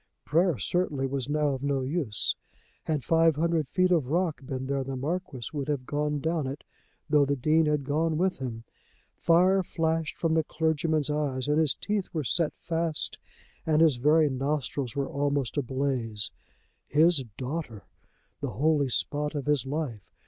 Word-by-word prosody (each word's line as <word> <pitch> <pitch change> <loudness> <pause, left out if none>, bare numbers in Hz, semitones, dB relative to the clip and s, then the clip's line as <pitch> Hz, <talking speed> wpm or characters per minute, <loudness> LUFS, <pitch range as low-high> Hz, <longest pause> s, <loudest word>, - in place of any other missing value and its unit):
Prayer 170 0 +2
certainly 150 -5 0
was 135 -1 -2
now 150 0 +2
of 135 -2 -2
no 140 -2 0
use. 135 -6 -1 0.5
Had 150 -4 -1
five 165 +3 +4
hundred 165 -1 +1
feet 185 +5 +2
of 160 -8 +3
rock 160 -3 0
been 130 -1 -4
there 135 0 -1
the 135 0 -4
Marquis 140 -3 -3
would 140 -3 -3
have 145 -4 -1
gone 150 +1 -1
down 160 -1 -1
it, 135 +2 -6 0.4
though 150 -2 +4
the 140 0 +1
Dean 155 +4 +3
had 150 -2 +1
gone 155 +3 0
with 185 -1 +1
him. 115 -4 -5 0.5
Fire 180 +3 +4
flashed 165 -2 -1
from 165 -2 +1
the 160 -1 +3
clergyman's 155 -1 0
eyes, 140 -3 -1
and 150 +1 +3
his 155 -4 +2
teeth 205 -2 -2
were 155 -3 -1
set 160 +4 +1
fast 165 -2 -2 0.4
and 155 -1 +2
his 160 -6 +5
very 150 +4 +4
nostrils 135 -2 -2
were 140 -1 -1
almost 140 -3 -1
ablaze. 130 -6 -1 0.6
His 155 -1 +4
daughter! 130 - -4 0.6
The 140 - -3
holy 145 -1 +2
spot 150 +4 -1
of 145 - -3
his 145 -3 +1
life! 135 -8 -4
150 Hz, 165 wpm, -28 LUFS, 135-160 Hz, 0.6 s, his